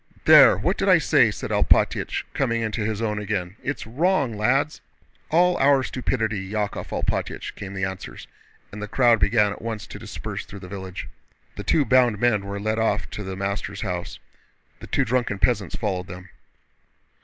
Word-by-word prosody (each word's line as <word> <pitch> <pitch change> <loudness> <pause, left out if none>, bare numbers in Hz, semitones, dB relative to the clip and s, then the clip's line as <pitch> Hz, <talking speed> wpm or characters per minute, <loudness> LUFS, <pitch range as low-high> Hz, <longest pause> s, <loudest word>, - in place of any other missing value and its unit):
"There! - - +8
What - - -1
did - - +1
I - - +7
say?" - - +4
said - - -6
Alpátych, - - +2
coming 115 -4 0
into 110 0 -2
his 110 +1 -2
own 105 -2 -1
again. 95 -3 -3
"It's 145 - -4
wrong, 140 - +1
lads!" 135 +8 +1 0.5
"All 175 +2 +4
our 135 -1 +4
stupidity, 110 -7 -2
Yákov 105 -1 -3
Alpátych," - - -3
came 100 0 -8
the 95 - -3
answers, 95 -1 -7 0.4
and 105 - -8
the 105 - -4
crowd 120 0 +4
began 105 -1 +3
at - - -8
once 110 -3 -5
to 105 - -10
disperse 95 - -6
through 100 - -11
the 90 - -9
village. 95 -1 -7 0.5
The 105 - -6
two 145 +8 +2
bound 125 -2 +4
men 105 -4 +1
were 100 0 -4
led 110 +2 -1
off 105 -5 0
to 105 - -6
the 95 -1 -5
master's 100 +1 -4
house. 90 -1 -4 0.6
The - - -10
two - - +1
drunken 120 -3 0
peasants 100 -4 0
followed 95 -5 -2
them. 90 +1 -10
105 Hz, 180 wpm, -24 LUFS, 100-120 Hz, 0.6 s, There